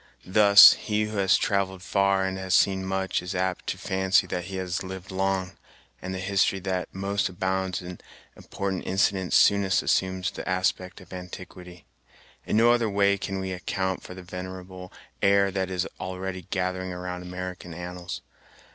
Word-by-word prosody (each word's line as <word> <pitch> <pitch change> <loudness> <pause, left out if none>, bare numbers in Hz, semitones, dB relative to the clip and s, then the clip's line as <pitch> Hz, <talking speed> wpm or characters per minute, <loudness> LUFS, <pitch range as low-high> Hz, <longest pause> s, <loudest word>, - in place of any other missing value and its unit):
Thus, 100 +2 +9
he 105 0 -1
who 105 0 -4
has 95 -1 +4
travelled 95 -2 -1
far 100 0 +2
and 95 0 -4
seen 95 0 +3
much 95 -1 -1
is 90 +2 -5
apt 95 0 -2
to - - -2
fancy 95 0 +2
that 90 -1 -4
he 95 0 -7
has 95 -1 -3
lived 95 0 -7
long; 95 -1 -1 0.5
and 95 - -5
the 95 - -3
history 95 +1 +1
that 95 -1 -2
most 100 +1 -1
abounds 95 0 -2
in 90 0 -8 0.4
important 95 -2 -4
incidents 95 0 +1
soonest 100 -1 +4
assumes 95 0 0
the - - -6
aspect 95 0 -1
of 90 +1 -14
antiquity. 90 -1 -10 0.6
In - - +1
no 115 +1 +6
other 120 -2 +2
way 100 0 +3
can 95 0 -4
we 95 0 -4
account 95 0 -2
for 90 - -10
the 95 - -10
venerable 90 0 -8 0.3
air 100 0 +4
that 95 -1 -2
is 90 -1 -1
already 95 -1 -5
gathering 95 0 -2
around 90 0 -5
American 90 0 -7
annals. 90 0 -6
95 Hz, 165 wpm, -26 LUFS, 90-95 Hz, 0.6 s, Thus